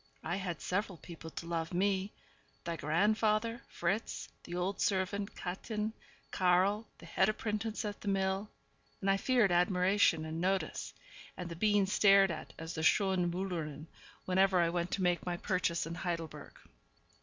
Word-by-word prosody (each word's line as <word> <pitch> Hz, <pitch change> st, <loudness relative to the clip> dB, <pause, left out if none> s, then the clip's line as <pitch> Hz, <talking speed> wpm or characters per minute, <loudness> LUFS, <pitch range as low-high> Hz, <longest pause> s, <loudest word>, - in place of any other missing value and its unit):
I 175 Hz, +4 st, -1 dB
had 180 Hz, -4 st, -4 dB
several 195 Hz, -1 st, -2 dB
people 165 Hz, -1 st, -10 dB
to 165 Hz, -, -7 dB
love 165 Hz, 0 st, -2 dB
me 195 Hz, +1 st, +1 dB, 0.5 s
thy 170 Hz, -1 st, -3 dB
grandfather, 215 Hz, -, +1 dB
Fritz, 195 Hz, +6 st, -2 dB, 0.2 s
the 175 Hz, -, -6 dB
old 185 Hz, +2 st, -1 dB
servant 200 Hz, +1 st, 0 dB
Kätchen, 210 Hz, +4 st, -3 dB, 0.4 s
Karl, 190 Hz, +4 st, +2 dB
the -, -, -13 dB
head 190 Hz, +4 st, +2 dB
apprentice 215 Hz, +1 st, -2 dB
at 205 Hz, -1 st, -5 dB
the -, -, -8 dB
mill 195 Hz, +1 st, 0 dB, 0.5 s
and 195 Hz, 0 st, +2 dB
I 195 Hz, -, +3 dB
feared 235 Hz, -2 st, +3 dB
admiration 180 Hz, -1 st, +3 dB
and 160 Hz, +1 st, -4 dB
notice, 190 Hz, +1 st, -1 dB, 0.4 s
and 180 Hz, -1 st, -5 dB
the 170 Hz, -, -6 dB
being 205 Hz, +2 st, +3 dB
stared 195 Hz, -1 st, +5 dB
at 160 Hz, -, -6 dB
as 165 Hz, +1 st, -6 dB
the 160 Hz, -, -3 dB
'Schöne 185 Hz, +1 st, +3 dB
Müllerin,' 170 Hz, -5 st, -3 dB, 0.4 s
whenever 190 Hz, 0 st, +3 dB
I 170 Hz, -1 st, +3 dB
went 175 Hz, +1 st, -1 dB
to 190 Hz, -, 0 dB
make 175 Hz, -1 st, +2 dB
my 175 Hz, -1 st, -2 dB
purchases 170 Hz, -2 st, 0 dB
in 165 Hz, -, -5 dB
Heidelberg. 170 Hz, -3 st, -5 dB
185 Hz, 155 wpm, -33 LUFS, 170-200 Hz, 0.5 s, stared